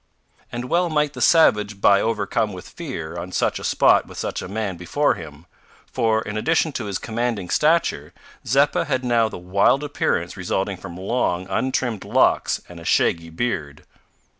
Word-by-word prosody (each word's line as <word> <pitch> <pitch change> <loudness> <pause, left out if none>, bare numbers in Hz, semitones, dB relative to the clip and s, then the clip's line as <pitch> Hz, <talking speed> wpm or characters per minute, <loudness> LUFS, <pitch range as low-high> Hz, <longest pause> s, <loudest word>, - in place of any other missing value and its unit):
And 120 +1 -4
well 175 +6 +1
might 150 -2 0
the - - -7
savage 105 - +4
by 100 0 +5
overcome 110 -1 -1
with 90 - -9
fear, 85 - -7
on 90 +2 -7
such - - 0
a - - -9
spot - - +3
with - - -12
such - - -3
a - - -6
man 100 -1 -3
before 90 - +1
him, 75 -1 -10 0.4
for, 110 -3 0
in 105 - -6
addition 160 +6 +1
to 125 -5 -4
his 100 -2 -2
commanding 115 -5 -3
stature, 150 - +1 0.3
Zeppa 140 +4 +2
had 130 -3 -1
now 115 -2 +2
the - - -7
wild 100 +10 +2
appearance 85 - -1
resulting 95 +1 -2
from 85 0 -9
long 95 -2 -1
untrimmed 125 -1 -1
locks - - +2
and 90 -1 -11
a - - -11
shaggy 85 0 +1
beard. 80 -6 -3
105 Hz, 170 wpm, -22 LUFS, 90-130 Hz, 0.4 s, by